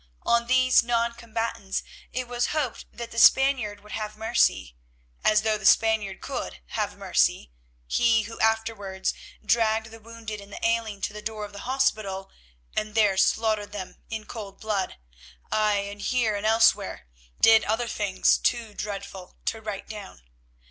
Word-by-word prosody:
On 235 0 +2
these 255 0 +5
non 235 0 0
combatants 225 -4 -3 0.3
it 255 0 -3
was 245 0 0
hoped 260 -7 -2
that 235 -1 -8
the 230 - -2
Spaniard 255 -7 +4
would 210 +1 -15
have 215 -1 -4
mercy—as - - 0
though 215 -1 +1
the - - -12
Spaniard 215 -4 +3
could - - -5
have - - -2
mercy, - - +1 0.3
he 225 - +3
who 225 +2 -9
afterwards 220 -4 0 0.3
dragged 220 -1 +2
the 225 - -11
wounded 220 -1 -8
and 200 0 -14
the - - -5
ailing 225 -3 -1
to - - -2
the 210 - -7
door 215 0 -4
of 205 - -12
the 200 +5 -8
hospital 215 -8 0 0.4
and 215 0 -2
there 210 -3 +4
slaughtered 210 +1 +1
them 190 -3 -7
in 220 -1 -5
cold 205 -4 -8
blood; 205 -4 -2 0.5
aye, 210 -2 +2
and 205 0 -8
here 235 -2 +1
and 205 +1 -1
elsewhere, 220 - +3 0.3
did 225 -1 +7
other 225 +3 0
things 200 -4 +2
too 230 -3 0
dreadful 195 -3 -7
to 225 - -2
write 210 -2 -6
down. 205 - -9
215 Hz, 155 wpm, -26 LUFS, 205-230 Hz, 0.5 s, did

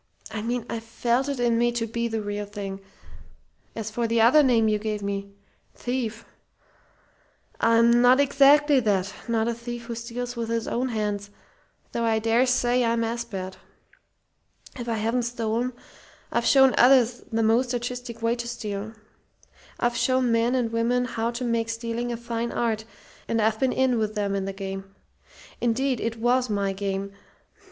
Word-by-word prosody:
I 215 -1 -4
mean 235 +1 -2
I 230 - -3
felt 235 +4 -1
it 280 -3 -3
in 235 -1 +2
me 240 0 +3
to 235 -1 -1
be 235 +1 -2
the 225 -2 -3
real 205 0 -4
thing. 200 -1 -6 0.9
As 220 -1 -4
for 235 +1 -1
the 230 0 +1
other 240 +7 +6
name 235 -5 +3
you 210 -1 +1
gave 210 -1 -3
me 200 0 -3 0.4
thief 235 -2 -3 1.3
I'm 230 +1 +4
not 250 +2 +6
exactly 285 +1 +5
that 200 -4 0
not 225 -1 +1
a 235 - 0
thief 240 0 -7
who 235 - -5
steals 240 +2 -5
with 230 -1 -3
his 230 -1 -1
own 255 +2 -1
hands, 210 -3 -2 0.6
though 235 - -2
I 225 -1 +2
dare 230 +3 +2
say 245 0 +2
I'm 230 0 +1
as 235 +1 -2
bad. 190 -4 -6 1.2
"If 240 -2 -6
I 230 - 0
haven't 225 +3 0
stolen, 235 +1 -1 0.6
I've - - +1
shown 265 -1 +6
others 250 -2 +5
the 225 0 +1
most 235 +3 +2
artistic 245 -1 -4
way 230 +1 +2
to 235 0 -5
steal. 215 -2 -5 0.9
I've 240 0 +1
shown 255 -2 +2
men 230 +2 +2
and 240 -3 0
women 240 +2 +1
how 230 -2 -2
to 240 +1 -4
make 230 -1 0
stealing 230 +1 -3
a 235 - -3
fine 235 0 -3
art, 220 -2 -1 0.4
and 230 - 0
I've 220 0 +1
been 260 -1 +2
in 255 -3 +2
with 215 0 -2
them 200 -1 -1
in 195 -1 -1
the 195 - -3
game. 195 0 -7 0.7
Indeed, 245 +2 +1
it 230 0 -2
was 245 +2 +1
my 200 -2 0
game. 195 0 -3
230 Hz, 175 wpm, -25 LUFS, 220-245 Hz, 1.3 s, other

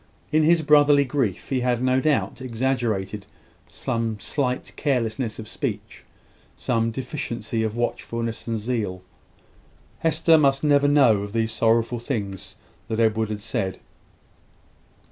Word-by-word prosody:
In 155 - +4
his 160 +1 +4
brotherly 145 -1 +5
grief 125 -8 -2
he 130 - +1
had 125 -1 +1
no 130 0 +3
doubt 150 -2 0
exaggerated 115 -5 -2 0.4
some 115 -2 -3
slight 130 -1 -2
carelessness 120 -4 -1
of 110 - -8
speech, - - -5 0.5
some 115 -1 0
deficiency 120 -3 -4
of 110 0 -2
watchfulness 115 -1 -3
and 115 -1 -1
zeal. 105 -5 -3 1.0
Hester 165 0 +4
must 140 -1 +2
never 145 -1 +4
know 135 -8 +5
of 100 0 -6
these 115 -1 0
sorrowful 115 +1 +1
things 105 -7 -5 0.3
that 110 - -2
Edward 110 -1 +2
had 105 -1 -4
said. 95 -2 -3
115 Hz, 125 wpm, -24 LUFS, 110-135 Hz, 1.0 s, brotherly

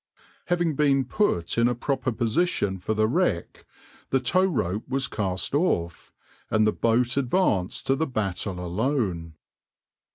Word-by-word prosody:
Having 175 -3 0
been 140 -3 +3
put 115 - 0
in 115 - +4
a 120 - 0
proper 130 +2 -1
position 115 - 0
for 110 +5 -2
the 110 0 +2
wreck 120 - -1 0.4
the 135 - +2
tow 185 +9 +2
rope 110 - -2
was 135 0 0
cast 95 -1 -3
off, 115 - -1 0.4
and 110 0 +3
the 110 - +3
boat 120 +4 +1
advanced 125 - 0
to 135 - +2
the 160 +3 -1
battle 100 -5 -2
alone. 90 - -2
115 Hz, 140 wpm, -25 LUFS, 95-140 Hz, 0.4 s, in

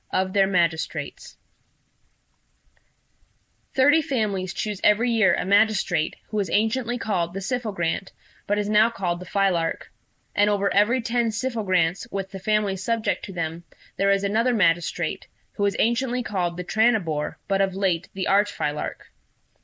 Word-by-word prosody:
OF 185 0 -1
THEIR 195 -2 +4
MAGISTRATES 170 -4 -2 2.4
"Thirty 290 +4 +5
families 210 -10 -2
choose 210 -1 -4
every 225 +4 +4
year 215 -6 +4
a - - -2
magistrate, 200 -5 +2
who 215 - -3
was 200 -4 -1
anciently 235 +4 0
called 180 -6 -2
the - - -2
Syphogrant, 195 -5 -2 0.4
but 205 - +1
is 205 -1 -1
now 215 +2 +4
called 180 -6 -3
the 185 - -10
Philarch; 185 -5 0 0.4
and 205 0 +3
over 200 -1 +1
every 230 +5 +3
ten 235 0 0
Syphogrants, 200 -7 0
with 195 -1 -4
the 195 - -7
families 200 -1 0
subject 230 +1 -1
to - - -9
them, 165 -1 -4 0.3
there 195 - +1
is 200 0 +2
another 230 +5 +1
magistrate, 175 -4 0 0.2
who - - -8
was 200 0 +1
anciently 245 +2 +1
called 175 -6 -2
the 180 - -4
Tranibore, 190 -8 +1
but 195 0 +1
of 190 -1 0
late 190 -3 0
the 190 - -2
Archphilarch. 195 -7 0
200 Hz, 145 wpm, -24 LUFS, 185-220 Hz, 2.4 s, Thirty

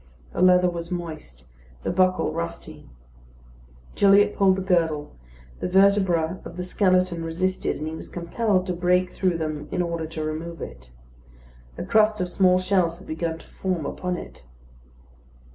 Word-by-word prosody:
The - - -2
leather 180 0 +6
was 170 -1 -4
moist; 155 - -7 0.4
the - - -1
buckle 185 -3 +2
rusty. 170 - -6 1.0
Gilliatt 205 +1 +5
pulled 190 -1 +4
the 190 - -3
girdle; 165 -5 0 0.4
the - - -2
vertebra 190 -3 +3
of 170 - -10
the 180 - -3
skeleton 185 -2 +1
resisted, 185 +3 -1
and 155 - -5
he 155 - -4
was 160 - -8
compelled 185 +2 0
to 180 - -2
break 180 +1 +1
through 185 -3 0
them 155 -2 -4
in 180 - 0
order 170 -2 -3
to 155 0 -5
remove 160 +2 -5
it. 60 0 -9 0.9
A - - -4
crust 215 -1 +3
of 180 -1 -1
small 185 0 +4
shells 185 -3 +1
had - - -14
begun 160 +1 -3
to - - -16
form 180 -5 -3
upon 180 -1 -3
it. - - -10
180 Hz, 160 wpm, -24 LUFS, 165-185 Hz, 1.0 s, leather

